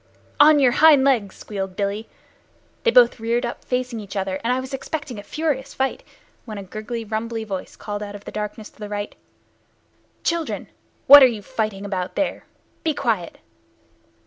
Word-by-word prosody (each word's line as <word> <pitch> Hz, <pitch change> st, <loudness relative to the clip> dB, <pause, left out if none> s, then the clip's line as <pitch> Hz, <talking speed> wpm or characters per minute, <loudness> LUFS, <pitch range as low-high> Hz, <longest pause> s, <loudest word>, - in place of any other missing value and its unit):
"On 300 Hz, +1 st, +8 dB
your 265 Hz, -4 st, +5 dB
hind 295 Hz, 0 st, +6 dB
legs!" 235 Hz, -8 st, +2 dB
squealed 195 Hz, -3 st, -5 dB
Billy. 205 Hz, +2 st, -2 dB, 0.7 s
They 470 Hz, -, +3 dB
both -, -, +5 dB
reared 235 Hz, +2 st, 0 dB
up 235 Hz, -, -6 dB
facing 250 Hz, -2 st, -2 dB
each 205 Hz, -1 st, -9 dB
other, 190 Hz, -1 st, -2 dB
and 235 Hz, -, +1 dB
I 255 Hz, -, +1 dB
was 260 Hz, +1 st, -7 dB
expecting 270 Hz, -4 st, -4 dB
a -, -, -6 dB
furious 280 Hz, +3 st, -3 dB
fight, 265 Hz, 0 st, -1 dB, 0.4 s
when 215 Hz, -3 st, -7 dB
a 200 Hz, -, -6 dB
gurgly, 215 Hz, +4 st, -6 dB
rumbly 225 Hz, +1 st, -3 dB
voice, 195 Hz, -4 st, -6 dB
called 205 Hz, -1 st, -5 dB
out 205 Hz, -1 st, -6 dB
of 205 Hz, -, -11 dB
the -, -, -7 dB
darkness 210 Hz, +1 st, -5 dB
to -, -, -26 dB
the 210 Hz, -1 st, -6 dB
right 205 Hz, 0 st, -4 dB, 1.1 s
"Children, 335 Hz, -1 st, -2 dB, 0.4 s
what 285 Hz, +1 st, +11 dB
are 260 Hz, -, +9 dB
you 220 Hz, -4 st, -4 dB
fighting 205 Hz, -1 st, -3 dB
about 185 Hz, -2 st, -3 dB
there? 295 Hz, -, -2 dB, 0.4 s
Be 315 Hz, -2 st, 0 dB
quiet." 225 Hz, -11 st, -1 dB
225 Hz, 175 wpm, -22 LUFS, 205-265 Hz, 1.1 s, what